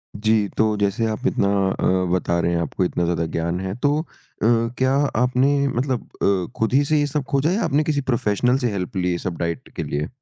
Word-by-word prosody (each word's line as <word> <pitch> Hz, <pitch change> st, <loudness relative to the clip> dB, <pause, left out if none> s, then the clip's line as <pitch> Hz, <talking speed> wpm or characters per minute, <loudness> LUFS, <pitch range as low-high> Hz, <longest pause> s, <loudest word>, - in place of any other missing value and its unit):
जी, 110 Hz, 0 st, +2 dB
तो 110 Hz, -1 st, +2 dB
जैसे 100 Hz, +3 st, 0 dB
आप 110 Hz, -, -4 dB
इतना 100 Hz, -, +1 dB, 0.2 s
अ, -, -, -2 dB, 0.3 s
बता 85 Hz, -1 st, 0 dB
रहे 85 Hz, 0 st, +1 dB
हैं, 85 Hz, -, 0 dB
आपको 85 Hz, +3 st, -1 dB
इतना 85 Hz, -, -1 dB
ज़्यादा 85 Hz, -1 st, 0 dB
ज्ञान 85 Hz, +2 st, -1 dB
है। 95 Hz, +1 st, -4 dB
तो 145 Hz, +1 st, +3 dB
अ, 165 Hz, -, -10 dB, 0.7 s
क्या 130 Hz, +1 st, +2 dB, 0.3 s
आपने 135 Hz, +3 st, +2 dB
मतलब 130 Hz, -1 st, -1 dB, 0.2 s
अ, 95 Hz, -3 st, +1 dB
खुद 110 Hz, +2 st, 0 dB
ही 140 Hz, +2 st, +5 dB
से 150 Hz, +1 st, +2 dB
ये 145 Hz, -, +1 dB
सब 145 Hz, 0 st, -2 dB
खोजा 140 Hz, +4 st, +2 dB
या 210 Hz, +4 st, 0 dB
आपने 155 Hz, -2 st, +2 dB
किसी 150 Hz, -2 st, 0 dB
प्रोफ़ेशनल 120 Hz, +2 st, +1 dB
से 125 Hz, -4 st, -1 dB
हेल्प 95 Hz, -2 st, -4 dB
ली 90 Hz, -1 st, +1 dB
ये 85 Hz, -, -1 dB
सब 85 Hz, -1 st, -4 dB
डाइट 85 Hz, -1 st, -3 dB
के -, -, -3 dB
लिए? 75 Hz, +2 st, -2 dB
110 Hz, 225 wpm, -22 LUFS, 90-140 Hz, 0.7 s, ही